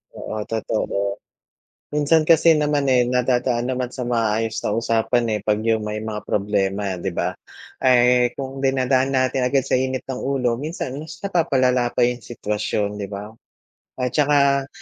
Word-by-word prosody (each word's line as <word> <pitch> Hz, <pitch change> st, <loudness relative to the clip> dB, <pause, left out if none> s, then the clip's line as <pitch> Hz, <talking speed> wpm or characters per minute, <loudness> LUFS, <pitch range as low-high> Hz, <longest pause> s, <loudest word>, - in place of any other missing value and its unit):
Oo, 110 Hz, -, -5 dB
totoo. 100 Hz, -2 st, -2 dB, 0.7 s
Minsan 150 Hz, +2 st, +3 dB
kasi 165 Hz, 0 st, +6 dB
naman 150 Hz, -1 st, +1 dB
eh, 125 Hz, -1 st, +3 dB
nadadaan 125 Hz, 0 st, +1 dB
naman 125 Hz, -1 st, -2 dB
sa 125 Hz, -, -4 dB
maayos 115 Hz, -2 st, 0 dB
na 105 Hz, -, -1 dB
usapan 115 Hz, +1 st, +1 dB
eh, 105 Hz, -, 0 dB
pag 105 Hz, 0 st, 0 dB
yung 110 Hz, -1 st, +1 dB
may 105 Hz, 0 st, -4 dB
mga 110 Hz, -1 st, -4 dB
problema 100 Hz, -1 st, -1 dB
di 95 Hz, -, -2 dB
ba. -, -, -1 dB, 0.5 s
Eh, 125 Hz, -1 st, +4 dB
kung 135 Hz, 0 st, -6 dB
dinadaan 135 Hz, 0 st, +1 dB
natin 130 Hz, 0 st, +1 dB
agad 135 Hz, +1 st, +1 dB
sa 130 Hz, -, +2 dB
init 130 Hz, 0 st, -2 dB
ng 130 Hz, -1 st, -3 dB
ulo 125 Hz, -4 st, 0 dB
minsan 145 Hz, -3 st, -5 dB
mas 155 Hz, +1 st, -9 dB
napapalala 130 Hz, -10 st, +2 dB
pa 125 Hz, -, +2 dB
yung 120 Hz, 0 st, +1 dB
sitwasyon, 105 Hz, -2 st, -3 dB
di 100 Hz, -, -4 dB
ba? 105 Hz, +1 st, -7 dB, 0.7 s
At 125 Hz, -1 st, -1 dB
tsaka, 140 Hz, -2 st, +3 dB
125 Hz, 160 wpm, -22 LUFS, 110-135 Hz, 0.7 s, kasi